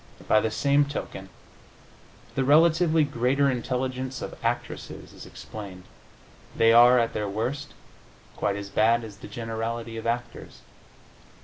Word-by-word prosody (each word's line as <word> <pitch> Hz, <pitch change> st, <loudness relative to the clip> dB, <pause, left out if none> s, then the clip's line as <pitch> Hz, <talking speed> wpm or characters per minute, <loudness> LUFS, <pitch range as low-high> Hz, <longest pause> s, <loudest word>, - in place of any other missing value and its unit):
By 110 Hz, -, +5 dB
the 110 Hz, -, 0 dB
same 140 Hz, +5 st, +2 dB
token, 95 Hz, -9 st, -6 dB, 1.0 s
the 135 Hz, -, 0 dB
relatively 160 Hz, +3 st, +4 dB
greater 140 Hz, 0 st, +1 dB
intelligence 130 Hz, +1 st, -3 dB
of -, -, -6 dB
actresses -, -, -4 dB
is -, -, -11 dB
explained. 95 Hz, -4 st, -9 dB, 0.7 s
They 115 Hz, 0 st, +5 dB
are, 120 Hz, +2 st, +7 dB
at 115 Hz, -1 st, +1 dB
their 105 Hz, -1 st, -2 dB
worst, 130 Hz, +8 st, -4 dB, 0.6 s
quite 100 Hz, -, -1 dB
as 100 Hz, 0 st, -6 dB
bad 115 Hz, +3 st, +2 dB
as 105 Hz, -3 st, -10 dB
the -, -, -10 dB
generality 115 Hz, 0 st, -5 dB
of 115 Hz, -, -5 dB
actors. 120 Hz, +1 st, -5 dB
120 Hz, 130 wpm, -26 LUFS, 110-135 Hz, 1.0 s, are